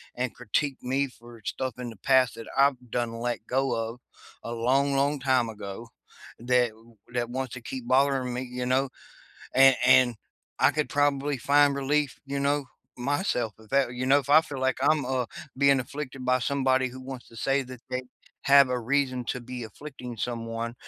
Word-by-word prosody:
and 125 0 -2
critique 135 +4 -1
me 135 +2 0
for 120 -2 -15
stuff 130 -3 -3
in 120 -1 -4
the 115 - -10
past 130 -2 +4
that 115 -1 -9
I've 140 0 +5 0.2
done 120 -1 0
and 115 0 -7
let 120 -2 -3
go 135 +1 +1
of, 115 +2 -4 0.4
a 115 - -5
long, 135 +4 +2
long 140 +1 +1
time 130 -3 +2
ago, 105 +1 -7 0.5
that 125 0 +2
w 115 +1 -20 0.2
that 120 -1 -1
wants 130 -1 -4
to 125 - -7
keep 125 0 -7
bothering 130 -1 +2
me, 125 - -3
you 125 0 -3
know? 130 +1 +1 0.7
And 135 0 +7
and, 130 -2 +6 0.4
I - - +6
could 150 -1 -1
probably 145 -1 +1
find 145 +3 +4
relief, 140 0 0
you 140 0 -3
know, 140 -1 +1 0.3
myself 125 - -1
if 110 -1 -18
that, 135 -3 +2
you 130 +1 -3
know? 140 +2 +5
If 140 +1 -8
I 155 +2 +8
feel 140 -4 -7
like 130 0 +1
I'm, 150 -1 +3
uh, 130 -2 -1 0.3
being 140 -1 +5
afflicted 135 0 -6
by 125 0 +3
somebody 130 0 +1
who 130 +1 -10
wants 130 -1 -8
to 115 - -15
say 135 +3 +1
that 125 -2 -10
they 130 0 -2 0.4
have 140 -1 +6
a 125 - 0
reason 130 0 0
to 125 - -2
be 125 -1 -7
afflicting 125 0 -9
someone, 115 0 -4
130 Hz, 195 wpm, -27 LUFS, 120-140 Hz, 0.7 s, I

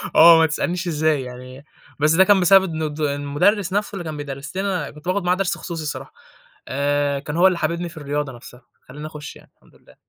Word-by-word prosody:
آه 165 0 +9
ما 160 - +5
تسألنيش 175 +3 -2
إزاي 155 -3 +1
يعني، 125 +2 -10 0.3
بس 150 +1 +3
ده 190 +3 +6
كان 195 0 +4
بسبب 190 +2 +6
إن 160 - -4
الد 155 0 -4
المدرس 150 +7 +1
نفْسُه 205 +1 -1
اللي 175 - -5
كان 155 -2 -6
بيدرس 145 +3 -7
لنا، 190 -6 -2
كنت 150 +3 -14
باخد 185 +1 0
معاه 180 +1 +2
درس 195 0 -1
خصوصي 165 -3 -6
الصراحة، 150 - -6 0.5
آآ، 145 +1 0
كان 150 +3 -5
هو 185 - +6
اللي 185 -2 +1
حاببني 170 +2 -2
في 165 - -15
الرياضة 145 -1 -3
نفْسَها، 120 +1 -13 0.2
خلّاني 150 +4 -9
أخش 150 -2 -9
يعني، - - -18
الحمد - - -26
لله. - - -22
155 Hz, 215 wpm, -21 LUFS, 145-180 Hz, 0.5 s, آه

